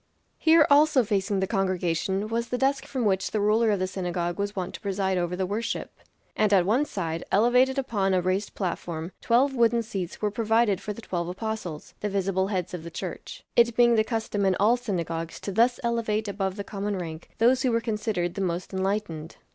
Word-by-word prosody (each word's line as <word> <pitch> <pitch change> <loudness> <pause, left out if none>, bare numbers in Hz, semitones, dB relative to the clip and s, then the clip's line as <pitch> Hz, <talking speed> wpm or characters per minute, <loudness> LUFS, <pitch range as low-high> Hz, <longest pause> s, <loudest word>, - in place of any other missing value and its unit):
Here 320 -1 +6
also 290 -2 +5
facing 200 -2 0
the - - +2
congregation 190 +1 -1
was 230 +1 -2
the 250 - -1
desk 270 +2 0
from 260 -5 -2
which 190 -2 +1
the 215 - -1
ruler 215 +2 +3
of 205 - +2
the 185 - 0
synagogue 180 -1 -3
was 200 0 -2
wont 185 -2 -3
to - - -8
preside 195 -1 -1
over 175 0 -1
the 190 +1 -1
worship; 210 +5 -3 0.4
and 215 -1 +2
at 190 -3 +5
one 240 +9 +2
side, 165 - -3
elevated 250 +5 +4
upon 200 -8 0
a - - +3
raised 185 +3 -1
platform, 170 -2 -3
twelve 255 +4 +3
wooden 235 -2 +3
seats 190 -6 -5
were 210 -1 0
provided 225 -1 +2
for 210 - -4
the 220 +2 -8
twelve 170 -3 -3
apostles 185 -5 -5
the 210 - -2
visible 195 -1 0
heads 185 -3 -2
of 180 - -4
the 170 - -7
Church; - - -7
it 235 -1 +4
being 240 -1 +5
the 220 -1 +4
custom 220 -2 -2
in 190 -1 +3
all 215 +4 +5
synagogues 170 -8 -4
to 200 - -4
thus 235 +5 +3
elevate 225 -2 0
above 195 -1 -2
the 200 - -4
common 200 0 -3
rank 165 -2 -7
those 250 +3 +4
who 260 -2 +2
were 230 - +2
considered 210 -6 -2
the 195 - -4
most 180 0 -2
enlightened. 190 -5 -2
205 Hz, 205 wpm, -26 LUFS, 185-230 Hz, 0.4 s, Here